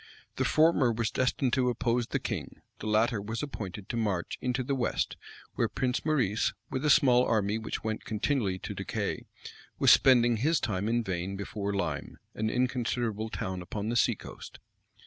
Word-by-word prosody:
The - - +1
former 155 -6 +4
was 115 -1 -1
destined 130 0 0
to 125 -2 +3
oppose 120 -1 0
the - - -1
king: - - -5 0.2
the 110 - -5
latter 110 0 +2
was 110 +4 -4
appointed 105 -8 -6
to 120 - -2
march 100 -6 -1
into 125 0 -1
the 140 - -1
west, 130 -3 -1 0.4
where - - 0
Prince 125 0 -1
Maurice, 130 -9 +1 0.2
with 130 +1 -2
a 150 - +2
small 130 -5 +6
army 110 -2 +1
which 110 - -5
went 110 -1 -3
continually 110 -3 0
to - - -6
decay, - - -3 0.5
was - - +6
spending 120 -3 +6
his 150 +7 +2
time 105 -3 -1
in 120 +1 +1
vain 95 0 -3
before 100 0 -3
Lyme, 100 -1 -3 0.2
an 110 +1 -1
inconsiderable 120 -3 -1
town 95 -4 -4
upon 105 +4 -4
the 120 - -1
sea - - +3
coast. - - -10
115 Hz, 175 wpm, -29 LUFS, 105-125 Hz, 0.5 s, small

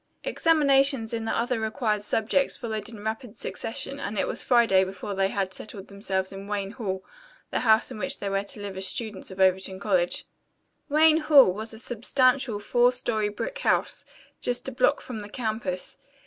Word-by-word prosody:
Examinations 275 -7 +3
in 225 -1 -2
the 225 - -1
other 240 0 0
required 220 -1 -1
subjects 225 +6 +1
followed 220 -5 -4
in 215 -3 -10
rapid 220 +1 -4
succession 275 +5 -3
and 210 -5 -4
it - - +1
was - - -3
Friday 230 -6 +4
before 190 +2 -5
they 195 0 +2
had 195 -1 -2
settled 200 -1 -8
themselves 195 -2 -2
in 195 +1 -8
Wayne 200 -1 -2
Hall, 190 -5 -4 0.5
the - - 0
house 220 -2 +4
in - - -7
which 275 +5 -1
they 200 - -4
were 195 0 0
to 205 - -8
live 200 -1 -6
as 190 0 -1
students 210 0 -4
of 190 0 -10
Overton 190 0 +2
College. 185 -4 0 0.6
Wayne 310 +2 +5
Hall 290 - +6
was 220 +3 -5
a 220 - -10
substantial 250 0 +1
four 240 +4 +3
story 220 -4 -1
brick - - -5
house, - - 0 0.4
just 245 0 0
a - - -2
block - - +2
from 245 -4 -6
the 205 0 -8
campus. 215 -5 -3
220 Hz, 185 wpm, -26 LUFS, 195-245 Hz, 0.6 s, Hall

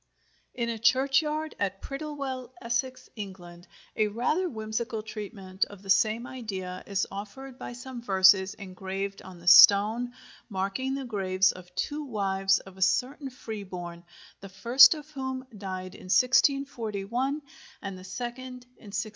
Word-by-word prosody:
In 235 -1 -1
a 230 -1 -3
churchyard 280 +6 +2
at 195 -1 -1
Prittlewell, 275 -3 -5
Essex, 255 +2 -2
England, 180 -4 -9 0.3
a 215 - +2
rather 250 - 0
whimsical 220 -1 -3
treatment 200 -3 -4
of 205 -1 -14
the 195 - 0
same 220 +4 +3
idea 190 -8 -6
is 200 -1 0
offered 210 +7 -8
by - - -6
some 250 0 -8
verses 190 -2 +5
engraved 195 0 -5
on 185 -1 -11
the 170 - -15
stone 210 +7 +7 0.4
marking 200 +7 -2
the 275 -1 -4
graves 190 -4 +2
of 180 -1 -13
two 290 +11 -2
wives 195 -6 +1
of 190 -1 -12
a - - -11
certain 265 +8 +1
Freeborne, 185 -8 -7 0.4
the 195 - -10
first 250 - +7
of 300 -1 -10
whom 265 -2 -4
died 185 -2 -6
in - - -12
1641 255 +1 +1 0.4
and 195 -1 -5
the 185 - -11
second 245 +6 -6
in - - -18
1658. 215 +2 -2
215 Hz, 145 wpm, -28 LUFS, 190-255 Hz, 0.4 s, stone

